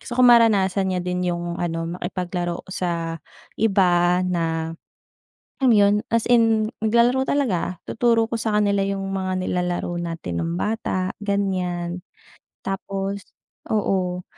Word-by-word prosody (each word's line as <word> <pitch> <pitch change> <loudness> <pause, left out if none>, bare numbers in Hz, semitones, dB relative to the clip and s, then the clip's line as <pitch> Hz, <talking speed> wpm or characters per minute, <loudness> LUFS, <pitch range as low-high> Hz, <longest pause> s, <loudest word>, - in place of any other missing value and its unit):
Gusto 240 - -7
ko 255 - +4
maranasan 205 -5 +5
niya 180 - -1
din 180 0 -1
yung 175 0 -3
ano, 165 -1 -2
makipaglaro 175 -1 -3
sa 165 -3 -3 0.4
iba 180 -4 +3
na, 165 -2 -1 0.9
um, 265 - +4
yun 205 0 +4
as 230 -1 +2
in 225 -2 +3
naglalaro 235 +4 +3
talaga. 185 - -1
Tuturo 230 -1 +2
ko 230 - -1
sa 220 -1 -1
kanila 200 -1 +2
yung 195 -1 -3
mga 185 -1 -2
nilalaro 180 -1 -1
natin 165 - -4
nung 85 +1 -2
bata, 190 -4 -1
ganiyan. 180 -3 -1 0.7
Tapos 195 0 -3 0.4
oo, 185 -4 0
190 Hz, 125 wpm, -23 LUFS, 175-215 Hz, 0.9 s, maranasan